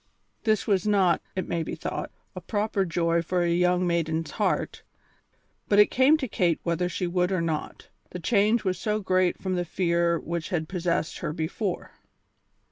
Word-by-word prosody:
This 215 -2 +2
was 200 -2 +1
not, 195 -4 +3
it 185 -2 -2
may 170 - -1
be - - -4
thought, - - -4 0.3
a - - -6
proper 210 -2 -1
joy 170 -1 +1
for 175 +1 0
a 170 0 +1
young 180 +1 +2
maiden's 165 -2 -1
heart, - - -1 0.9
but 205 - +4
it 210 - +6
came 265 +5 +5
to 270 -4 -3
Kate 175 -6 +1
whether 175 +1 0
she 180 - -2
would 180 +1 0
or 185 - +1
not; 165 -2 -3 0.2
the - - -6
change 210 +5 +2
was 185 -2 -1
so 210 0 0
great 185 -2 +1
from 190 -1 -2
the 175 -1 0
fear 170 -1 +1
which 170 0 -4
had 160 -3 -1
possessed 170 -3 -1
her - - -3
before. 175 +4 -3
180 Hz, 180 wpm, -26 LUFS, 170-200 Hz, 0.9 s, it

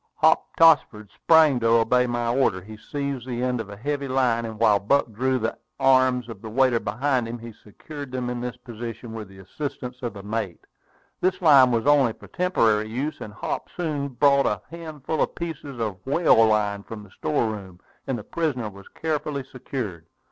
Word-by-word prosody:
Hop - - +2
Tossford 130 -11 +4
sprang 160 -5 +4
to 115 - +1
obey 115 +2 +4
my 120 -1 -1
order. 120 -9 +2
He 105 +4 -11
seized 140 +2 -5
the 125 -1 -3
end 125 -2 0
of 105 - -9
a 100 - -9
heave 140 +5 -2
line, 130 -4 +1
and 110 -1 -6
while 105 -3 +4
Buck 120 +4 +1
drew 130 +4 0
the 110 -2 -2 0.2
arms 130 -2 +3
of 110 -5 -9
the 110 - -7
waiter 125 0 +3
behind 125 +3 -1
him, 120 +1 -5
he 115 -1 -10
secured 140 +7 -10
them 125 -1 -3
in 120 0 -3
this 125 0 -5
position 120 -1 -8
with 110 -2 -6
the 95 0 -16
assistance 125 +4 -6
of 120 -4 -3
the 100 - -9
mate. 105 -4 -4 0.5
This 185 +1 +1
line 140 -7 +7
was 115 -1 0
only 140 -5 +4
for - - -15
temporary 110 -12 +1
use; 135 +7 -3
and 105 - -7
Hop 105 - -4
soon 150 -5 -2
brought 140 +1 +3
a 105 -1 -2
handful 160 -2 -4
of - - 0
pieces 150 -6 -6
of 105 -5 -3
whale 135 -6 +4
line 105 -2 +1
from 105 +1 -9
the 100 - -16
store 120 -4 -1
room, 95 -4 -9 0.3
and 135 -2 -1
the 105 - -7
prisoner 130 -9 -2
was 100 0 -14
carefully 150 -3 -2
secured. 110 -10 -6
125 Hz, 195 wpm, -24 LUFS, 110-140 Hz, 0.5 s, line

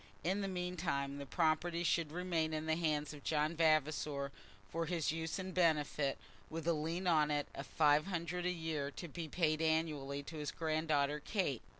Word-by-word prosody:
In 190 +5 +1
the 195 - -1
meantime 170 -7 -2
the 140 - -6
property 165 +2 +1
should 170 -3 +1
remain 165 -2 0
in 155 0 -2
the 160 0 +2
hands 155 -3 0
of 145 -2 -11
John 155 +1 +1
Vavasor 155 -3 +2 0.4
for 165 +5 -2
his 165 -3 +1
use 160 +1 -2
and 190 -1 -4
benefit, 150 -5 +2 0.3
with 165 0 -5
a 170 - +5
lien 165 +4 -2
on 155 -4 +4
it 145 -1 0
of 140 - -6
five 150 +1 +4
hundred 175 -1 -2
a - - +2
year 160 -5 -2
to 170 +4 -7
be 165 +1 -5
paid 155 -1 +1
annually 155 -3 0
to 160 +2 -8
his 150 -1 -2
granddaughter 155 -2 +1
Kate. 150 - -1
160 Hz, 185 wpm, -36 LUFS, 150-170 Hz, 0.4 s, a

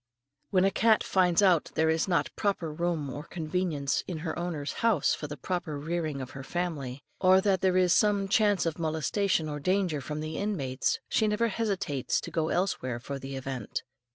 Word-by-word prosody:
When 185 -1 +3
a 195 - +3
cat 220 +2 +3
finds 180 0 +3
out 180 -5 +5
that - - -14
there 160 0 +3
is 160 +3 +1
not 175 -3 0
proper 185 -7 -1
room 170 -2 -1
or 145 - -5
convenience 160 -3 -2
in 175 - -4
her 160 - -2
owner's 170 -4 -3
house 230 -3 +3
for 150 - -4
the 150 0 -7
proper 160 0 -3
rearing 155 -2 -2
of 130 - -7
her 135 - -8
family, 140 -5 -3 0.2
or 185 0 +6
that 190 -2 +2
there 185 -1 +3
is 180 -1 +4
some 205 -2 +3
chance 205 -3 +3
of 165 0 -2
molestation 160 +2 0
or 145 -1 -4
danger 180 -2 0
from 150 +3 -5
the 155 0 -4
inmates, 140 -11 -1
she 220 - +2
never 220 +2 +1
hesitates 195 - -1
to - - -7
go 160 -1 0
elsewhere 130 -10 -1
for 140 +3 -6
the 135 0 -6
event. 130 -4 -4
170 Hz, 195 wpm, -29 LUFS, 145-190 Hz, 0.2 s, or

